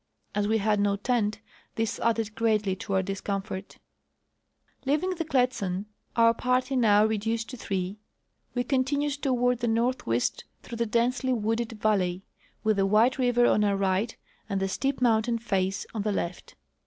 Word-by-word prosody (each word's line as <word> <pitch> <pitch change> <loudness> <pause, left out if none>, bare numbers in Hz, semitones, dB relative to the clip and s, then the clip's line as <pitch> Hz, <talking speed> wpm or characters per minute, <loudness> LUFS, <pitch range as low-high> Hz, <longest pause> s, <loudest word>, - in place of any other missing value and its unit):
As 205 0 0
Ave 220 +1 +2
had 210 0 +1
no 200 0 +2
tent, 210 -1 0 0.3
this 225 -1 -1
added 225 -2 0
greatly 215 -4 +1
to 200 +1 -5
our 190 0 +2
discomfort. 195 0 -4 1.1
Leaving 300 +7 +1
the 345 -2 -2
Kletsan, 245 - 0 0.3
our 230 0 +5
party 255 +3 0
noAv 215 -3 +5
reduced 225 +1 -1
to 255 - -7
three, 195 -2 -3 0.5
Ave 245 - 0
con 260 0 +2
tinued 285 +1 -1
toAvard 250 -3 +1
the 240 - -1
north 235 +3 +1
Avest 115 +1 0 0.2
through 235 - -7
the 235 0 0
densely 245 +3 +1
wooded 225 0 -1
valley, 195 -4 0 0.4
Avith 215 -1 +3
the 195 0 +3
White 225 +6 +3
river 245 -1 +3
on 210 - +3
our 200 -1 +2
right 195 +4 0 0.3
and 195 -1 0
the 195 - 0
steep 270 +7 -2
mountain 230 -1 +3
face 195 -4 -1
on 220 - -2
the 210 +1 0
left. 180 -2 -4
225 Hz, 165 wpm, -27 LUFS, 200-245 Hz, 1.1 s, our